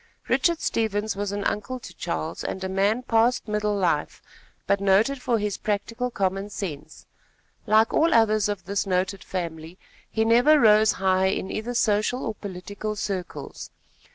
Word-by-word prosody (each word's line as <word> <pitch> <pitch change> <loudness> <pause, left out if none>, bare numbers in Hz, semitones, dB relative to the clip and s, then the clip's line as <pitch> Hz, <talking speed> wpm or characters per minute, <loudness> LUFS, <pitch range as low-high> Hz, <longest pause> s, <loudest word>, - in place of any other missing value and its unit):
Richard 340 -2 +2
Stevens 215 -2 -1
was 200 0 -3
an 205 0 -3
uncle 210 +7 -2
to 245 - -11
Charles, 165 -2 -4
and 190 - -4
a - - -1
man 200 +6 +1
past 235 +1 +2
middle 210 0 0
life, 175 -6 0 0.5
but 200 +1 +1
noted 210 +8 +3
for 240 -2 +1
his 210 -2 -2
practical 230 +4 -2
common 195 -2 -2
sense. 160 -8 -7 0.6
Like 220 +1 +4
all 330 +2 +3
others 215 -2 +3
of 205 -2 -4
this 200 +1 -2
noted 185 +1 -1
family, 170 -2 -5 0.3
he 220 0 0
never 245 +7 +5
rose 215 -2 +5
high 190 0 +2
in 190 0 -2
either 240 +3 -4
social 220 +2 +1
or 220 - -2
political 205 +2 -6
circles. 190 -3 -5
205 Hz, 155 wpm, -25 LUFS, 190-225 Hz, 0.6 s, never